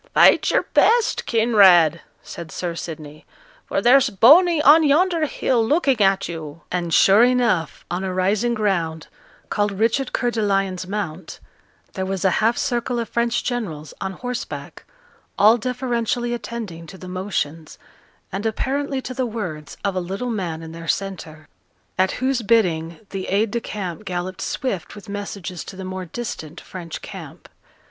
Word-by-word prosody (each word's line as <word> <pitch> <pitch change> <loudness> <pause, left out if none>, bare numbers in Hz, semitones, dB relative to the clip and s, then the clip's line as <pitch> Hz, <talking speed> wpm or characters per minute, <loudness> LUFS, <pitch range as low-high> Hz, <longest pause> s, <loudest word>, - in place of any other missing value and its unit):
'Fight - - +6
your - - +2
best 470 -1 +3
Kinraid!' 190 -8 +5 0.2
said 165 -2 -9
Sir 175 -2 -3
Sidney; 155 -3 -8 0.4
'for - - -1
there's 265 +2 +6
Boney 305 - +6
on 300 +2 +7
yonder 320 +2 +3
hill 245 -4 +1
looking 275 -2 +2
at 195 0 +3
you.' 160 -2 -7
And 175 -2 -2
sure 195 +7 +6
enough, 235 -10 +1
on 180 +2 -2
a 190 - -2
rising 200 +6 +1
ground, 170 -7 -1 0.4
called 205 -1 0
Richard 225 +6 0
Coeur 245 -1 0
de 230 - -2
Lion's 195 -3 0
Mount, 185 -4 -5 0.5
there 190 - -3
was 195 0 -2
a 190 - +4
half 230 +2 +2
circle 240 -1 -1
of 230 -1 -3
French 235 0 0
generals, 165 - -4
on 190 0 -3
horseback, 245 +5 -6 0.5
all 215 +3 +6
deferentially 240 0 -1
attending 220 -9 -6
to 190 - -11
the 185 - -10
motions, 175 -4 -4 0.5
and 195 +2 -4
apparently 270 +4 -2
to 255 - -5
the 255 -1 -1
words, 180 -10 -6
of 200 - +1
a - - +1
little 195 +7 -4
man 170 -7 -3
in 160 - -8
their 165 0 -9
centre; 160 -6 -4 0.5
at 190 0 +3
whose 260 -1 0
bidding 175 -7 +1
the 195 -1 -4
aide 205 +2 +1
de 235 - -2
camp 195 -3 -5
galloped 185 +1 -4
swift 195 - -3
with 210 +1 -12
messages 200 -4 -6
to - - -10
the 190 0 -7
more 185 0 -5
distant 170 -5 -6
French 170 -3 -8
camp. - - -10
200 Hz, 160 wpm, -22 LUFS, 175-240 Hz, 0.5 s, on